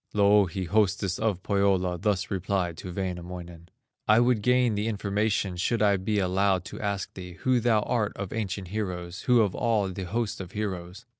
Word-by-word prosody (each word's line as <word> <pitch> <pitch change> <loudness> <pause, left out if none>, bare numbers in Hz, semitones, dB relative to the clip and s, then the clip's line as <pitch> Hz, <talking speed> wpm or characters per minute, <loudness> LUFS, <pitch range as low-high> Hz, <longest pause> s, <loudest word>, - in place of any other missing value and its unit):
Louhi, 100 -3 +4
hostess 100 0 +1
of 105 -4 -1
Pohyola, 95 -3 +1
Thus 100 0 0
replied 95 -2 -1
to 90 - -7
Wainamoinen: 90 -2 -6 0.4
"I 110 +1 +6
would 120 -2 +3
gain 125 0 +3
the 105 +2 -1
information, 105 -2 0
Should 110 +4 +1
I 100 -1 +4
be 105 +3 -1
allowed 95 -1 +1
to 95 - -8
ask 100 -2 -2
thee, 90 -1 -8
Who 130 -1 +3
thou 115 -2 +3
art 105 -1 0
of 100 -1 -5
ancient 100 -4 -3
heroes, 90 -3 -4
Who 120 -2 +6
of 100 -4 +1
all 110 -5 +1
the 95 0 -5
host 105 +2 -2
of 90 0 -9
heroes?" 95 0 -4
100 Hz, 175 wpm, -27 LUFS, 90-105 Hz, 0.4 s, I